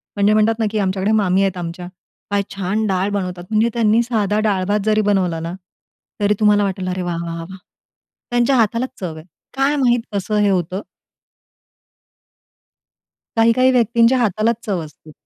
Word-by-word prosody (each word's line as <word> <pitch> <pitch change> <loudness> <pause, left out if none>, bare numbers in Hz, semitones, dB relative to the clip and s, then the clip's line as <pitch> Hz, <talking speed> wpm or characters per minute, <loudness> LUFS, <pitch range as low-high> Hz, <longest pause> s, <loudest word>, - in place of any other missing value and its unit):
म्हणजे 205 +1 +3
म्हणतात 215 +1 +2
ना 225 - +1
की 215 - -2
आमच्याकडे 195 +1 0
मामी 195 -3 +2
आहेत 195 -2 0
आमच्या. 175 +1 -6 0.4
काय 205 0 +2
छान 200 +3 -1
डाळ 190 +1 0
बनवतात! 180 -3 -3
म्हणजे 220 +2 +2
त्यांनी 225 -1 +3
साधा 215 -3 0
डाळ 205 -3 +1
भात 205 +1 +1
जरी 215 0 +3
बनवला 190 -5 +1
ना, 165 +1 -5 0.7
तरी 205 0 +3
तुम्हाला 210 -1 +4
वाटेल, 190 -1 -3
"अरे 185 0 -3
वाह, 175 -1 -3
वाह, 165 0 -5
वाह, 165 - -6
वाह!" 190 - -9 0.7
त्यांच्या 240 +2 +2
हातालाच 230 +3 +1
चव 175 -4 -5
आहे. 155 0 -11 0.3
काय 275 +2 +2
माहीत 245 -4 +2
कसं 205 +2 -1
हे 205 - +3
होतं. 185 +1 -1 2.5
काही-काही 230 +3 +4
व्यक्तींच्या 235 0 +3
हातालाच 225 0 +1
चव 195 -4 -1
असते. 155 0 -16
205 Hz, 165 wpm, -19 LUFS, 185-225 Hz, 2.5 s, तुम्हाला